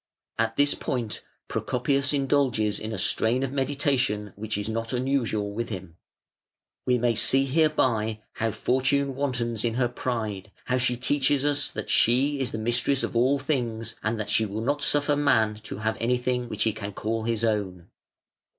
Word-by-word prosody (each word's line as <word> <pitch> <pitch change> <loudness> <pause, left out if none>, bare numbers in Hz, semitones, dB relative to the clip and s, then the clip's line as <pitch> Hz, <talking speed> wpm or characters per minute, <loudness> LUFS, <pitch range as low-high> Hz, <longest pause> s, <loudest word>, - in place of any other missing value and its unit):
At 115 0 0
this 145 0 +3
point 115 -4 -3 0.3
Procopius 135 +2 0
indulges 135 -7 +1
in 110 - -5
a 110 - -3
strain 115 +7 +1
of 135 - -2
meditation 135 -7 0
which 110 0 -4
is 105 - -3
not 115 +1 -3
unusual 125 -5 0
with 115 +2 -3
him: 95 -5 -7 0.9
"We 125 -1 +4
may 120 0 +2
see 135 +4 +3
hereby 130 -8 +1
how 115 - -1
Fortune 130 +5 +1
wantons 120 -5 -1
in 115 -1 0
her 125 -1 +2
pride, 110 -5 -4
how 125 0 +1
she 125 -1 +1
teaches 140 +2 +2
us 145 -1 +1
that - - -5
she 135 +5 +3
is 130 -4 -1
mistress 120 +4 0
of - - -3
all 130 +4 +3
things, 120 -6 -2
and 110 +1 -1
that 105 - -3
she 110 - +3
will 105 +1 -3
not 145 +5 0
suffer 145 0 +2
Man 115 -7 +3
to - - -6
have 110 +1 -1
anything 125 +1 0
which 110 -1 -1
he 110 - +1
can 105 -1 -6
call 110 +2 -2
his 115 -1 -1
own". 95 -6 -1
120 Hz, 170 wpm, -26 LUFS, 110-135 Hz, 0.9 s, We